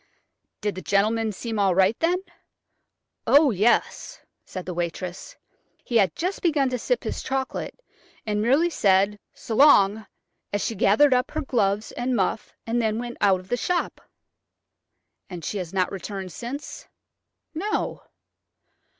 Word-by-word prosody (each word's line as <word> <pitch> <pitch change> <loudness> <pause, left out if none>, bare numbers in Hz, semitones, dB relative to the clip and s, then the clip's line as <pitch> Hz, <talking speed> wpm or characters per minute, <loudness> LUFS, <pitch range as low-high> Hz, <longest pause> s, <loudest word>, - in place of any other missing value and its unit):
'" - - -55
"Did 210 -1 -1
the 185 - -7
gentleman 215 +3 +1
seem 220 +2 -4
all 195 -3 +3
right 190 +3 +4
then?" 355 +3 +1 1.0
"Oh, 285 -1 +6
yes," 230 - +1 0.3
said 185 - -7
the 180 - -4
waitress. 175 - -5 0.5
"He 235 - 0
had 195 -6 +2
just 365 +4 -3
begun 295 -6 +2
to 250 - -2
sip - - -1
his - - -4
chocolate, 265 - -4 0.5
and 210 -1 -1
merely 280 +10 +3
said 200 -4 +2 0.2
'S'long,' 220 -5 +4 0.4
as 205 - -1
she - - -1
gathered 225 +8 +4
up 250 +1 +1
her 310 - -3
gloves 210 -6 0
and 250 +1 -2
muff 200 +1 -1
and 235 +1 0
then 220 -1 0
went 240 0 -5
out 195 -3 +3
of 185 - -20
the 245 - 0
shop." 355 +7 -2 1.3
"And 175 -4 -7
she 205 - -3
has 175 -3 -5
not 185 -2 0
returned 195 -1 -6
since?" 250 - -7 0.7
"No." 395 +7 -2
220 Hz, 150 wpm, -24 LUFS, 195-265 Hz, 1.3 s, Oh